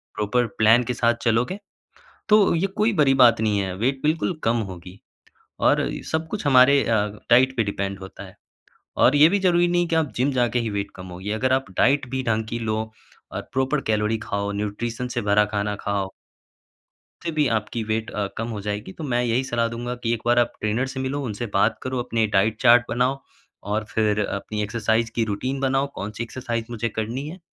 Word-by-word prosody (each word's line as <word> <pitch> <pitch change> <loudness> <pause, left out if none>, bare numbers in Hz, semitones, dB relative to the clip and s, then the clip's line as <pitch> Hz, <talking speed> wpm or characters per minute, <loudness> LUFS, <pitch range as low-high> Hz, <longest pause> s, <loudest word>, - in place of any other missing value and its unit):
Proper 115 +3 0
plan 115 +3 +5
के 125 +1 -2
साथ 120 0 +2
चलोगे, 125 - +1 0.7
तो 210 -4 +5
ये 175 +4 +1
कोई 215 +2 +2
बड़ी 135 -2 +5
बात 115 -2 +5
नहीं 105 -2 +1
है। 95 -2 -3
वेट 130 +5 -1
बिल्कुल 155 +2 0
कम 115 +1 +2
होगी। 90 +2 -11 0.7
और - - +4 0.3
सब 160 0 0
कुछ 195 -4 -4
हमारे 140 +1 +6
अ, 115 -1 +2 0.3
डाइट 130 +2 +5
पे 115 - +3
डिपेंड 100 -1 -3
होता 95 0 -10
है। - - -14 0.6
और 130 - +5
ये 145 +2 +8
भी 200 +3 +1
ज़रूरी 175 -2 +3
नहीं 175 0 +2
है 175 - 0
कि 165 - +1
आप 160 -4 +1
जिम 130 +4 +1
जाके 120 0 +2
ही 115 - -2
वेट 100 0 -3
कम 90 0 -9
होगी। 90 +3 -6
अगर 130 +4 +1
आप 135 0 +1
डाइट 135 0 +3
भी 130 0 -2
ढंग 110 -1 0
की 115 - -3
लो, 110 0 -2 0.4
और - - -4
प्रॉपर 135 +2 0
कैलोरी 110 +1 +1
खाओ, 100 0 -2
न्यूट्रिशन 105 +4 -3
से 120 -1 -3
भरा 105 0 +3
खाना 105 0 -1
खाओ 100 -1 -3 1.1
फिर 170 - -3
भी 150 -3 +2
आपकी 110 0 -2
वेट 110 +1 -2
अ, 105 -1 -2
कम 115 +1 -2
हो 105 -3 -5
जाएगी। 105 -1 -4
तो - - -9
मैं 125 -4 0
यही 120 +2 +1
सलाह 120 -2 0
दूँगा 120 +1 -4
कि 115 0 +1
एक 115 - -3
बार 120 0 +4
आप 120 -1 +1
ट्रेनर 110 +5 0
से 130 0 -6
मिलो, 135 +2 -2
उनसे 115 0 -4
बात 105 +3 +2
करो, 130 -1 -2
अपने 115 -2 0
डाइट 105 +2 +1
चार्ट 120 +1 +6
बनाओ, 125 +3 0 0.4
और 105 +2 -1
फिर 105 -1 +1
अपनी 105 +2 -4
एक्सरसाइज़ 110 +1 0
की 115 - +2
रूटीन 130 +6 -3
बनाओ, 135 +1 +1
कौन-सी 105 +3 -5
एक्सरसाइज़ 115 -1 -4
मुझे 115 0 -2
करनी 115 +6 -4
है। 175 +5 -8
115 Hz, 205 wpm, -23 LUFS, 105-130 Hz, 1.1 s, ये